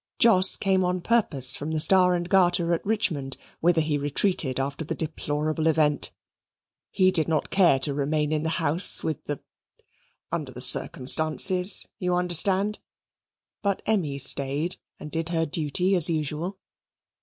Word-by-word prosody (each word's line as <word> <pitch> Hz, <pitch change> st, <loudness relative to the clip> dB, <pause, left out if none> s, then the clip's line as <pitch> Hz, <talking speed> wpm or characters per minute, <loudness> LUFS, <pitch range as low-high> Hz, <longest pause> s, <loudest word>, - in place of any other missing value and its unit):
Jos 190 Hz, -5 st, +5 dB
came 190 Hz, -1 st, 0 dB
on 180 Hz, 0 st, -1 dB
purpose 145 Hz, -, 0 dB
from 150 Hz, -, -6 dB
the 160 Hz, -, -1 dB
Star 180 Hz, +2 st, +4 dB
and 175 Hz, 0 st, -4 dB
Garter 175 Hz, -2 st, +2 dB
at 165 Hz, -, -3 dB
Richmond, 160 Hz, -11 st, -2 dB, 0.2 s
whither 170 Hz, -1 st, +2 dB
he 150 Hz, -2 st, -2 dB
retreated 145 Hz, -2 st, 0 dB
after 140 Hz, +3 st, -4 dB
the 155 Hz, -, -5 dB
deplorable 155 Hz, 0 st, -3 dB
event. 150 Hz, -3 st, +1 dB, 0.8 s
He 185 Hz, -1 st, +2 dB
did 165 Hz, -4 st, +1 dB
not 160 Hz, -2 st, -2 dB
care 180 Hz, -8 st, +3 dB
to 140 Hz, +2 st, 0 dB
remain 150 Hz, +2 st, -2 dB
in 155 Hz, -1 st, -1 dB
the 160 Hz, -, -2 dB
house, 165 Hz, +2 st, +2 dB
with 160 Hz, -3 st, -4 dB
the 145 Hz, -2 st, -5 dB, 0.9 s
under 145 Hz, -5 st, -4 dB
the 125 Hz, -, -10 dB
circumstances, 155 Hz, +8 st, +1 dB
you 180 Hz, -1 st, -1 dB
understand. 190 Hz, +4 st, +1 dB, 0.8 s
But 200 Hz, -2 st, -2 dB
Emmy 175 Hz, -11 st, -1 dB
stayed 140 Hz, +5 st, +2 dB, 0.2 s
and 150 Hz, -, -10 dB
did 165 Hz, 0 st, -3 dB
her 165 Hz, -1 st, -1 dB
duty 165 Hz, +5 st, -1 dB
as 170 Hz, -3 st, +5 dB
usual. 160 Hz, +4 st, -3 dB
160 Hz, 150 wpm, -24 LUFS, 145-185 Hz, 0.9 s, Jos